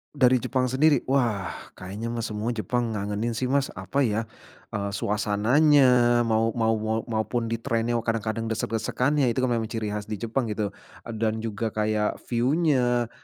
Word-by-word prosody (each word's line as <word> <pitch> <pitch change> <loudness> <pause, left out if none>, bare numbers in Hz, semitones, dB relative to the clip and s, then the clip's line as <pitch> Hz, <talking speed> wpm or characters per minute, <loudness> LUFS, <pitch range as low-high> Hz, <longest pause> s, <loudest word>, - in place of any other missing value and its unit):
Dari 130 -2 +5
Jepang 130 +1 -1
sendiri, 145 +2 +3
wah 115 -8 +1 0.2
kayaknya 100 +5 -7
mah 120 - -2
semua 110 +1 -2
Jepang 115 +2 -1
ngangenin 105 +3 -2
sih 125 +2 -2
Mas, 140 0 +1
apa 130 +9 -1
ya, 110 0 -1 0.4
eee, 100 0 -3
suasananya, 120 +4 +3
mau 115 -1 +1
mau 115 -1 +1
mau 110 +1 -1
maupun 115 +1 -1
di 115 - -1
train-nya 115 +1 -1
kadang-kadang 115 0 -1
desek-desekannya, 115 +6 0
itu 130 - -1
memang 120 -3 +1
ciri 110 -1 -3
khas 105 0 -4
di 105 -1 -6
Jepang 120 +2 -1
gitu, 105 -1 -2 0.4
eee, 115 - -5
dan 110 0 0
juga 110 0 -3
kayak 105 0 0
view-nya, 125 -2 +2
115 Hz, 160 wpm, -25 LUFS, 110-125 Hz, 0.4 s, Dari